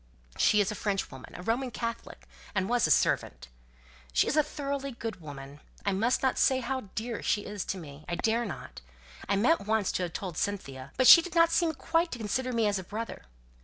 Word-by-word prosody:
She 210 - +4
is 205 +1 0
a 210 - -7
Frenchwoman, 195 -11 -3
a 180 - -8
Roman 245 +5 0
Catholic, 230 -1 -6 0.3
and 190 -1 +1
was 245 0 +2
a - - -3
servant. - - +1 0.6
She - - +3
is - - 0
a 305 - +6
thoroughly 280 -2 -4
good 225 -5 -6
woman. 140 -1 -9 0.3
I 200 - +2
must 225 +8 +1
not 265 - +1
say 260 -1 +4
how 260 -4 -4
dear 230 +1 -3
she 205 - 0
is 205 -3 -4
to 190 - -3
me. 150 -4 -10
I 175 - -1
dare 225 +5 +1
not. 210 - -7 0.5
I 200 - +3
meant 225 +2 +2
once 220 -2 +1
to - - -2
have 175 -2 -3
told 180 -5 -5
Cynthia, 140 -10 -4
but 255 - +3
she 335 - +11
didn't 335 -1 +3
seem 330 -2 +2
quite 330 +5 0
to - - -4
consider 250 +4 -2
me 230 -2 +1
as 205 -2 +1
a - - -6
brother. 215 +4 -6
220 Hz, 210 wpm, -29 LUFS, 190-260 Hz, 0.6 s, she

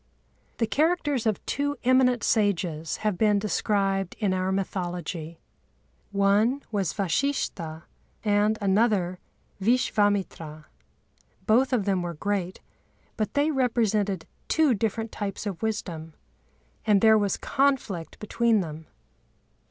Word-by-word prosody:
The 230 - +1
characters 290 -2 +1
of 215 - -1
two 285 0 -1
eminent 250 -2 +3
sages 175 -7 0
have 210 -4 0
been 210 -2 +4
described 195 -2 0
in 200 -4 0
our 185 0 0
mythology. 175 -4 -3 0.7
One 205 +7 +2
was 195 -6 0
Vashishtha 185 - -2 0.4
and 210 +1 +2
another 195 -3 +1 0.4
Vishvâmitra. 205 -8 0 0.8
Both 250 +5 +3
of 235 -6 +1
them 195 -3 +1
were 175 -1 -4
great, 190 +1 -2 0.5
but 215 -2 -3
they 290 +2 +3
represented 215 - +1 0.2
two 315 -5 +3
different 225 +1 -2
types 200 0 -4
of 195 -5 -4
wisdom; 170 -8 -4 0.7
and 205 -3 +3
there 220 -1 +7
was 200 -2 0
conflict 265 -11 0
between 225 0 +1
them. 155 -2 -7
205 Hz, 115 wpm, -26 LUFS, 185-230 Hz, 0.8 s, there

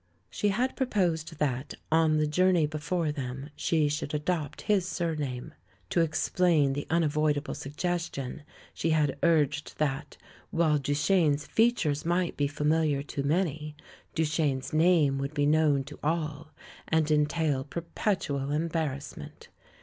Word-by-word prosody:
She 210 - 0
had 240 +6 0
proposed 175 - 0
that, 135 -3 -2 0.2
on 160 -1 +4
the 155 - +2
journey 180 +1 +3
before 155 +2 -1
them, 135 0 -5
she 155 -3 +1
should 150 0 -2
adopt 150 -1 -2
his 195 -4 +1
surname. 150 -9 -3 0.4
To 170 - +3
explain 160 -2 +2
the 145 +1 -4
unavoidable 155 -3 +1
suggestion, 155 -2 -3 0.3
she 165 - -1
had 150 -3 +1
urged 150 -3 +2
that, 145 -1 -2 0.3
while 160 -3 +2
Duchene's 150 +1 +2
features 175 -11 +2
might 175 +1 0
be 145 - +1
familiar 150 0 +1
to 145 -1 -4
many, 150 0 -1 0.4
Duchene's 155 -4 0
name 155 -4 +4
would 140 +2 -4
be 145 -1 +2
known 150 -2 +3
to 145 +2 -11
all 155 0 -2 0.4
and 160 -1 +2
entail 150 -2 +1
perpetual 150 -3 -2
embarrassment. 150 -2 -3
155 Hz, 125 wpm, -28 LUFS, 145-165 Hz, 0.4 s, on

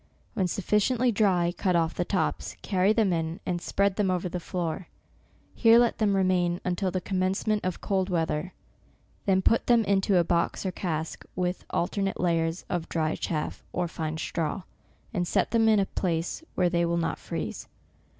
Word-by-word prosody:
When 185 - +1
sufficiently 210 +7 +1
dry, 185 -5 +2
cut 180 -1 +1
olf 165 -1 +2
the 175 - -1
tops, 185 +1 -1
carry 190 +1 +2
them 215 -4 +2
in, 165 0 -2
and 175 -2 -2
spread 200 +2 +1
them 205 -3 +2
over 180 0 0
the 180 +1 -4
floor. 170 0 -3 0.7
Here 230 -1 +6
let 240 -1 +3
them 205 -2 +2
remain, 180 -2 +2
until 180 +1 0
the 185 +1 -1
commencement 195 +3 0
of 185 -1 -3
cold 190 -1 0
weather; 165 0 -1 0.8
then 190 -1 +3
put 230 - +3
them 235 -2 +5
into 195 -1 +2
a 175 - +5
box 170 +3 0
or 190 - 0
cask, 160 -3 -3
with 180 0 -2
alternate 195 +2 -1
layers 165 -1 0
of 175 -2 -3
dry 155 -1 0
chaff, 155 -3 -3
or 180 -1 0
fine 160 -1 -4
straw, 165 +3 -2 0.5
and 175 -4 -1
set - - +1
them 225 -1 +4
in 215 -2 +5
a 195 - +2
place 170 - -2
where 180 - +3
they 170 -1 +1
will 170 0 +1
not 170 - -1
freeze. - - -5
180 Hz, 180 wpm, -27 LUFS, 170-195 Hz, 0.8 s, Here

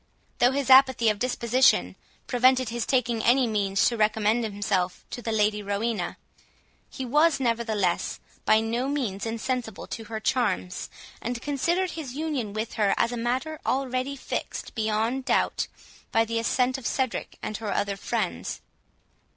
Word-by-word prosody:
Though 245 - +6
his 270 -1 0
apathy 260 -3 +7
of 210 -1 -1
disposition 250 +1 +3 0.3
prevented 255 0 +3
his 235 0 -3
taking 240 -4 +1
any 250 +2 +4
means 200 -3 +1
to 240 - 0
recommend 215 +2 +2
himself 200 -4 -1
to 245 - -5
the 230 - -3
Lady 210 -1 +2
Rowena, 205 -1 -2 0.7
he 265 - -5
was, 295 +4 +3
nevertheless, 225 -7 0 0.2
by 215 0 +4
no 235 +4 -1
means 235 -8 -2
insensible 230 -1 -3
to 225 - -7
her 220 +1 -5
charms, 215 -7 -1 0.3
and 240 0 -3
considered 335 +7 0
his 285 -6 -6
union 290 -8 -2
with 215 +2 -4
her 200 -1 +3
as 235 - +2
a - - -3
matter 255 +7 -2
already 260 +1 -1
fixed 270 - -5
beyond 220 +4 0
doubt, - - +1 0.4
by 225 0 +3
the 230 0 -1
assent 250 +3 +1
of 240 - -4
Cedric 260 -3 -2
and 215 - -3
her 220 -2 -4
other 200 -1 0
friends. - - -3
235 Hz, 150 wpm, -26 LUFS, 215-260 Hz, 0.7 s, apathy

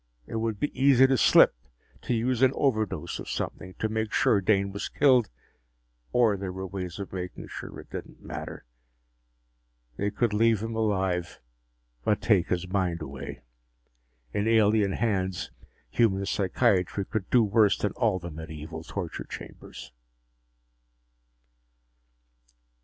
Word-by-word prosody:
It 115 - -5
would 110 -2 -2
be 145 - -2
easy 135 -1 +7
to 135 0 +3
slip, 115 - +6 0.5
to 125 - -1
use 120 +2 0
an 130 0 +5
overdose 110 - -1
of - - -7
something, 90 0 -4
to 110 - -1
make 110 0 -2
sure 100 - +3
Dane 100 0 +2
was 100 - -4
killed. 130 -5 +4 0.8
Or 120 -4 +4
there 95 -1 -4
were 95 +1 -5
ways 90 -2 -5
of 100 -2 -7
making 90 -1 -6
sure - - -8
it - - -13
didn't - - -8
matter. - - -7 1.3
They 100 - 0
could 110 +1 0
leave 110 0 +3
him 115 0 -4
alive, 95 -5 -1 0.6
but 105 - +2
take 100 -7 +3
his 90 0 -1
mind 90 -4 -1
away. 70 -2 -8 0.9
In 105 +2 0
alien 105 -3 +3
hands, 95 -6 -1 0.4
human 100 -4 +2
psychiatry 100 -1 +1
could 110 -2 -4
do 120 -2 +5
worse 105 -1 +3
than 105 - -1
all 110 -5 +1
the 85 -1 -7
medieval 80 0 -8
torture 90 -1 -5
chambers! - - -10
100 Hz, 135 wpm, -27 LUFS, 95-115 Hz, 1.3 s, easy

